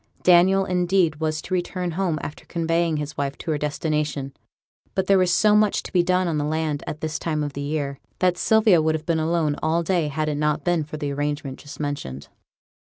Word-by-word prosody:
Daniel, 185 +2 +5
indeed, 180 -3 +1
was 155 0 -2
to - - -5
return 180 0 -2
home 170 -2 -1
after 145 - -7
conveying 165 -1 0
his 150 0 -4
wife 140 -1 -2
to 165 - -4
her 150 - +1
destination; 150 -2 -2 0.6
but 190 - +1
there 195 0 +4
was 180 -1 +3
so 210 +4 +4
much 210 -1 +3
to - - -10
be 180 - +5
done 180 +1 +1
on 160 -3 0
the - - 0
land 155 -1 -1
at 150 - -5
this 155 0 -3
time 155 -2 -1
of 145 -1 -4
the 140 - -5
year, 140 -1 -3 0.2
that 180 -1 +2
Sylvia 215 -2 +4
would 160 0 +1
have 155 0 -5
been 165 -2 +1
alone 160 -2 +1
all 165 +2 +1
day 170 -2 +1
had 155 +2 -2
it 150 -1 -1
not 150 0 0
been 175 -1 +1
for 155 +1 -7
the 145 -2 -3
arrangement 145 -1 -3
just 145 - -11
mentioned. 140 - -4
155 Hz, 220 wpm, -23 LUFS, 150-175 Hz, 0.6 s, Daniel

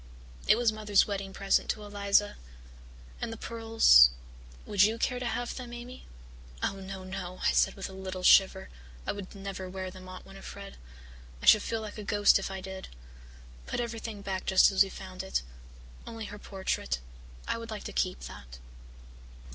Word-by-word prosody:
It - - +6
was 235 -2 +3
Mother's 210 -2 +3
wedding 195 -1 -4
present 195 0 +1
to 215 - -2
Eliza. 205 0 +1 0.9
And - - -3
the 225 - -6
pearls 225 - +6 0.6
would 200 -2 +1
you 215 +3 +5
care 250 +1 0
to 250 - -4
have 240 0 -2
them, 245 -2 -7
Amy?" 245 +2 -9 0.6
"Oh, 195 - 0
no, 190 0 -7
no," 185 -1 -6
I - - +4
said - - +3
with 195 - -5
a 190 - -11
little 190 -1 -6
shiver. 190 0 +5 0.4
"I - - 0
would 200 0 -8
never 195 -1 -6
wear 185 0 -5
them, 185 0 -11
Aunt 185 - -9
Winnifred. 195 +1 -10 0.6
I - - -8
should 215 - +8
feel 225 +1 -2
like 215 0 -7
a - - -5
ghost 205 -1 +4
if 195 - -4
I 190 -1 -5
did. 190 0 -7 0.8
Put - - -2
everything 225 -3 -5
back 190 -1 -4
just 190 +1 +6
as 190 - +3
we 195 - +5
found 185 -1 -8
it 190 - -2 0.6
only 225 -1 -6
her 205 0 -8
portrait. 190 - -2 0.5
I - - -1
would 230 0 -8
like 215 -1 -6
to - - -7
keep 185 -1 -1
that." - - -10
195 Hz, 180 wpm, -30 LUFS, 190-215 Hz, 0.9 s, should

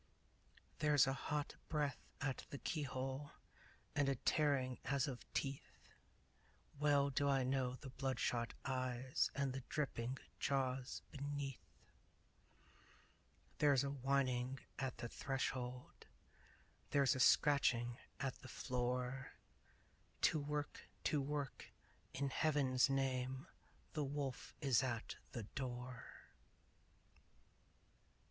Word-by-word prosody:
There's 150 -2 +6
a 135 - +1
hot 145 +1 -2
breath 145 -5 0 0.2
at 135 -3 -2
the 140 - -5
keyhole 135 -1 -2 0.6
And 145 -1 +3
a 135 - +2
tearing 130 -2 +2
as 140 -1 +2
of 130 -3 -6
teeth! 135 -1 -3 0.9
Well 145 -1 +4
do 140 +1 +2
I 135 -1 +4
know 130 -1 +1
the 130 0 -9
bloodshot 125 -3 0
eyes 130 -1 +1
And 140 -1 +1
the 135 - -3
dripping 130 -3 -1 0.2
jaws 130 -1 0
beneath! 140 -1 -3 2.0
There's 140 -3 +5
a 140 - -1
whining 130 -1 +1 0.2
at 135 -3 -2
the 120 - -3
threshold 125 -1 -3 0.8
There's 140 -2 +4
a - - -2
scratching 125 -4 +5 0.2
at 135 -2 -2
the - - -9
floor 125 +1 -1 0.9
To 155 - +4
work! 150 0 -3
To 150 - +2
work! 145 0 -3 0.4
In 140 +1 0
Heaven's 140 -4 +3
name! 130 0 0 0.5
The 150 - 0
wolf 140 -2 -3
is 135 -5 +4
at 120 -4 -2 0.2
the 115 - -3
door! 125 +1 -6
135 Hz, 105 wpm, -40 LUFS, 125-140 Hz, 2.0 s, There's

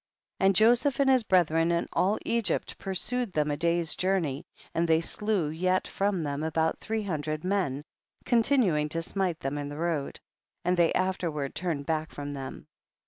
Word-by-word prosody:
And 195 0 +4
Joseph 240 +6 +4
and 280 - +4
his 260 -1 +5
brethren 170 -5 +3
and 170 0 0
all 200 +4 +2
Egypt 230 -3 -1
pursued 225 +4 -2
them 150 -1 +1
a - - 0
day's 170 +1 0
journey, 175 -6 -1 0.3
and 170 +1 +1
they 160 0 +4
slew 195 -1 0
yet 185 +4 0
from 195 -4 0
them 145 0 -3
about 160 0 0
three 220 0 -2
hundred 155 -4 -3
men, 180 -8 0 0.4
con 240 -2 +4
tinuing 190 - +2
to 165 +2 -2
smite 180 -2 -2
them 140 +2 -2
in 145 0 -4
the 145 - -7
road; 160 -4 -2 0.5
and 180 +1 +3
they 170 -2 +3
afterward 170 -7 -1
turned 160 -5 -2
back 155 0 -1
from 145 0 -6
them. 135 -2 -7
170 Hz, 175 wpm, -28 LUFS, 155-195 Hz, 0.5 s, his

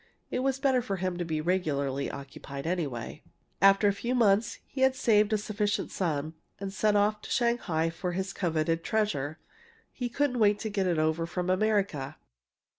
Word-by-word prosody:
It - - 0
was 265 0 +1
better 270 -2 +2
for 200 -4 -3
him 185 -1 -2
to 175 - -1
be 155 -2 -2
regularly 140 -6 0
occupied, 140 0 -8
anyway. 155 -9 -3 0.4
"After 195 +1 +6
a 200 - +3
few 240 +5 -2
months 220 -1 +3
he 270 - -6
had 265 0 +4
saved 215 -4 +3
a 215 - +3
sufficient 210 0 -1
sum, 155 -4 -2 0.3
and 195 -1 -5
sent 210 +1 +2
off 210 +1 +2
to - - -10
Shanghai 200 -10 +1
for 175 +2 -4
his 190 +1 -3
coveted 165 -2 0
treasure 160 -10 -1 0.5
he 245 -2 -4
couldn't 255 0 0
wait 205 -1 +4
to 220 - -3
get 195 -2 0
it 175 -2 +1
over 160 +1 +1
from 180 +2 -1
America! 185 -8 0
195 Hz, 180 wpm, -29 LUFS, 160-215 Hz, 0.5 s, After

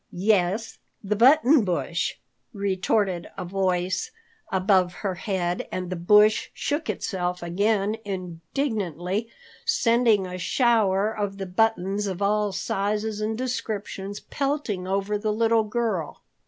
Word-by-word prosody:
"Yes, 200 +2 +1 0.2
the 210 +1 0
Button 270 +3 +6
Bush," 175 -2 -1 0.4
retorted 195 -2 0
a 185 - -4
voice 185 - -1 0.4
above 185 -1 +3
her 190 - +1
head, 180 -2 -2
and 185 0 -4
the - - -1
Bush 210 +5 +4
shook 295 +2 -2
itself 180 -2 -2
again 200 +4 +1
indignantly, 185 - -3 0.3
sending 235 - +3
a 180 0 -6
shower 215 -1 +2
of 205 -2 -3
the 195 - -4
buttons 200 0 +1
of 190 -2 -4
all 205 0 +1
sizes 210 +3 -2
and 220 +1 -1
descriptions 210 -5 -4
pelting 275 -10 -2
over 200 +2 -1
the 215 0 0
little 225 0 +2
girl. 210 -7 -2
200 Hz, 120 wpm, -25 LUFS, 185-220 Hz, 0.4 s, Button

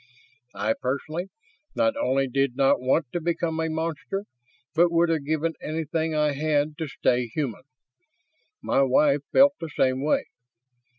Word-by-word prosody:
I, 110 +2 0
personally, 155 +8 -3 0.5
not 280 -1 +2
only 135 - +1
did 135 0 0
not 135 -1 +3
want 130 +1 +1
to 175 - -2
become 165 -1 -1
a 160 0 0
monster, 165 +5 -3 0.5
but 170 +1 +4
would 170 0 +3
have 160 -4 0
given 160 +1 0
everything 160 +1 -2
I 150 -1 +2
had 150 +1 0
to 160 - -2
stay 125 -2 0
human. 125 -1 -3 1.0
My - - +2
wife 140 +2 +3
felt 280 +1 +6
the 165 - -5
same 130 -2 0
way. 150 - +2
155 Hz, 150 wpm, -25 LUFS, 135-165 Hz, 1.0 s, felt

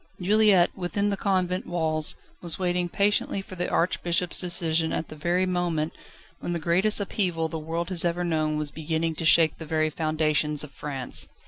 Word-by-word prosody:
Juliette, 200 -1 +4
within 200 +3 -1
the - - 0
convent 185 -2 -1
walls, 160 -3 0 0.3
was 170 -2 +1
waiting 180 -1 -1
patiently 200 +1 +1
for 195 -1 -9
the 180 - -2
Archbishop's 175 0 0
decision 165 -3 +1
at 160 - -3
the - - -9
very 175 +4 0
moment, 175 -4 -1 0.5
when 175 - -4
the - - -1
greatest 180 +7 +3
upheaval 180 -5 -1
the 160 - -4
world 165 +3 -4
has 180 -3 +3
ever 175 +1 0
known 155 -3 0
was 150 -1 -3
beginning 160 +1 -2
to 165 +1 -5
shake 160 0 +5
the 160 - -7
very 155 0 0
foundations 155 -1 0
of 150 - -9
France. 135 -4 -3
170 Hz, 180 wpm, -26 LUFS, 155-180 Hz, 0.5 s, shake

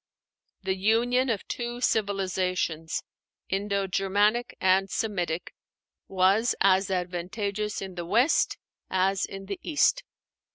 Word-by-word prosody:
The 190 0 0
union 240 +6 +2
of 220 -4 -2
two 240 0 -4
civilizations 185 -7 -1 0.5
Indo 200 0 0
Germanic 205 +5 +1
and 190 +1 +3
Semitic 180 -7 -2 0.5
was 195 +5 +3
as 195 0 +4
advantageous 195 +4 -2
in 190 -1 -7
the 175 -1 -5
West 240 - +3 0.3
as 190 +1 +1
in 195 0 -8
the 200 0 -5
East. 335 +10 +2
195 Hz, 110 wpm, -27 LUFS, 185-215 Hz, 0.5 s, as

